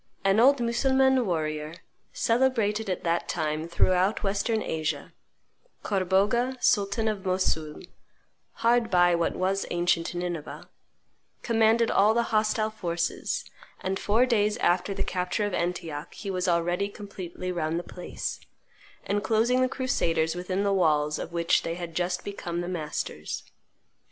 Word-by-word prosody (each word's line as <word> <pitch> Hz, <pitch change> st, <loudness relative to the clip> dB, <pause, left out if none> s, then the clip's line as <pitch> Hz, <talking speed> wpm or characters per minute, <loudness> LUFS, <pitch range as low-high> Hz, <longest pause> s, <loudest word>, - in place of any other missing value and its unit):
An 195 Hz, +2 st, +3 dB
old 275 Hz, +3 st, +6 dB
Mussulman 265 Hz, +1 st, +2 dB
warrior, 155 Hz, -2 st, -2 dB, 0.4 s
celebrated 225 Hz, -4 st, +1 dB
at 185 Hz, -, -2 dB
that 170 Hz, 0 st, 0 dB
time 155 Hz, -1 st, -2 dB
throughout 185 Hz, +5 st, +2 dB
Western 205 Hz, +3 st, 0 dB
Asia, 155 Hz, -1 st, -3 dB, 0.7 s
Corbogha, 205 Hz, +7 st, +1 dB
sultan 205 Hz, 0 st, +2 dB
of 210 Hz, -3 st, -2 dB
Mossoul 185 Hz, -5 st, -1 dB, 0.8 s
(hard 235 Hz, -1 st, +4 dB
by 175 Hz, -1 st, +4 dB
what 170 Hz, -1 st, 0 dB
was 190 Hz, +1 st, 0 dB
ancient 175 Hz, 0 st, 0 dB
Nineveh), 175 Hz, -3 st, -5 dB, 0.8 s
commanded 225 Hz, 0 st, +3 dB
all 210 Hz, +3 st, +4 dB
the 235 Hz, 0 st, 0 dB
hostile 215 Hz, 0 st, +2 dB
forces, 170 Hz, -5 st, -2 dB, 0.4 s
and 190 Hz, +1 st, -2 dB
four 225 Hz, +5 st, +3 dB
days 210 Hz, -4 st, +1 dB
after 185 Hz, +3 st, +1 dB
the -, -, -1 dB
capture 180 Hz, +3 st, -1 dB
of 205 Hz, -, -3 dB
Antioch 165 Hz, -4 st, -3 dB
he 200 Hz, -, -5 dB
was 185 Hz, 0 st, -1 dB
already 175 Hz, +3 st, +1 dB
completely 185 Hz, -3 st, -6 dB
round 165 Hz, -2 st, -1 dB
the 175 Hz, -, -3 dB
place, 180 Hz, +1 st, -6 dB, 0.7 s
enclosing 220 Hz, +5 st, +2 dB
the 255 Hz, -, +2 dB
crusaders 165 Hz, -12 st, 0 dB
within 185 Hz, +2 st, -2 dB
the 200 Hz, -1 st, +2 dB
walls 150 Hz, -5 st, +2 dB
of -, -, -5 dB
which 170 Hz, -1 st, +2 dB
they 165 Hz, -, -3 dB
had 170 Hz, -1 st, -6 dB
just 180 Hz, +1 st, -1 dB
become 175 Hz, -4 st, -4 dB
the 175 Hz, -, -4 dB
masters. 165 Hz, -4 st, -4 dB
190 Hz, 135 wpm, -27 LUFS, 170-220 Hz, 0.8 s, old